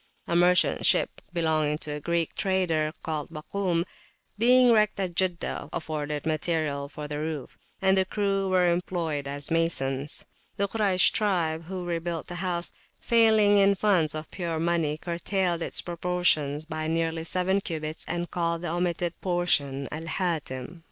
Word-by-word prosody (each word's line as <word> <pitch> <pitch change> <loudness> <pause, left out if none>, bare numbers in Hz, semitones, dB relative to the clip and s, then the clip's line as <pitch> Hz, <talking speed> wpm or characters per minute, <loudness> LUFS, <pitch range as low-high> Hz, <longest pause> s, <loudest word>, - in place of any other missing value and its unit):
A 170 - -1
merchant 180 +1 +4
ship - - +2
belonging 155 -3 +1
to 155 -1 -4
a 150 - -4
Greek 170 +1 -1
trader, 175 -5 +1
called 155 -2 -3
Bakum 155 -2 -7 0.4
([Arabic]), 175 - -4 0.5
being 245 +3 +5
wrecked 215 -3 +3
at 185 -3 -1
Jeddah, 180 -1 -1
afforded 150 -2 -3
material 155 -3 -1
for 150 0 -7
the 150 0 -4
roof, 155 -4 -4 0.3
and 190 0 +5
the 190 - +4
crew 195 0 0
were 180 -2 +4
employed 165 -5 -2
as 145 +2 -3
masons. 145 -4 0 0.3
The 200 - +1
Kuraysh 200 -3 +3
tribe, 170 -6 0
who 180 0 -5
rebuilt 170 -1 -3
the 175 - -7
house, 175 -2 -2 0.3
failing 220 -3 +5
in 200 0 +5
funds 180 -7 +2
of 155 0 -6
pure 170 -3 -3
money, 165 -3 +1
curtailed 175 +1 -1
its - - -1
proportions 170 -4 0
by 155 -1 -4
nearly 165 0 0
seven 185 +3 +1
cubits 155 -3 -5
and 175 0 -3
called 170 -1 -1
the 175 - -2
omitted 175 0 -1
portion 145 -7 0
Al 160 +2 -6
Hatim. 160 -4 -3
170 Hz, 155 wpm, -27 LUFS, 155-185 Hz, 0.5 s, being